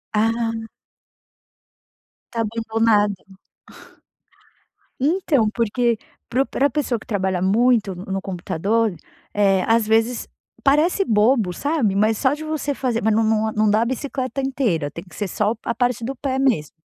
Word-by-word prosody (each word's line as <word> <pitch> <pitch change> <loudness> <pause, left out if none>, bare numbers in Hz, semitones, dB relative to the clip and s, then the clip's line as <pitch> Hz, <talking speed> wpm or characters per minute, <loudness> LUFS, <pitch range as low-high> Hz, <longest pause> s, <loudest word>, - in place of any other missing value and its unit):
Ah. 225 +1 +1 1.8
Tá 230 - 0
abandonada. 220 -2 +1 1.8
Então, 285 - +2
porque 235 0 +1 0.3
para 255 +3 +2
o - - -10
pra 280 +2 +1
pessoa 250 -4 -1
que - - -15
trabalha 190 -5 -1
muito 210 0 +2
no 190 +1 -4
computador, 195 +3 -1 0.4
eh, 195 -2 +3
às 225 -1 +3
vezes 225 +2 +1 0.4
parece 305 +8 +3
bobo, 215 -2 +3
sabe. 270 - 0
Mas 215 +1 +2
só 265 0 +2
de 310 +1 -6
você 310 -2 -2
fazer, 245 -4 -1
mas 220 0 +3
não 225 +1 +3
não 220 0 +1
não 215 0 +2
dá 215 +2 +3
a - - +2
bicicleta 260 +1 -3
inteira, 235 - 0
tem 170 - -8
que 175 -4 -16
ser 205 - -2
só 210 +4 0
a - - -1
parte 245 -1 0
do 270 - -4
pé 265 0 -2
mesmo. 240 - +1
225 Hz, 150 wpm, -21 LUFS, 205-260 Hz, 1.8 s, eh